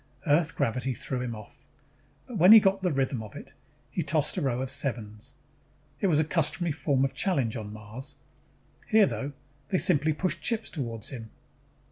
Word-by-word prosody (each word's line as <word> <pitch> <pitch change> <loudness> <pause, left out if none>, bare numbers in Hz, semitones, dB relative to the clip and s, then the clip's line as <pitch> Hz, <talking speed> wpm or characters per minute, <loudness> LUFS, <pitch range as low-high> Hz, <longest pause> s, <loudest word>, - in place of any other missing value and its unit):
Earth 160 +2 +2
gravity 125 -1 -1
threw 130 +1 -3
him 120 -2 -4
off. 105 -1 -13 0.6
But 240 -7 -6
when 185 +6 +9
he 225 - +11
got 195 -1 +1
the 180 -2 +1
rhythm 135 -3 0
of 110 -2 -10
it, - - -10 0.4
he - - -1
tossed - - 0
a - - -1
row 125 -3 0
of 130 - -3
sevens. 115 -6 -2 0.6
It 200 - +1
was 155 -5 +3
a - - +4
customary 155 +1 0
form 140 -3 +1
of 135 - -3
challenge 135 - 0
on 105 -3 -6
Mars. 110 +7 -9 0.7
Here, 215 -1 +5
though, 140 -5 -4 0.3
they 185 - +1
simply 155 -3 +3
pushed 170 0 -2
chips 225 +4 -1
toward 115 - -4
him. 115 -4 -7
140 Hz, 180 wpm, -28 LUFS, 120-170 Hz, 0.7 s, he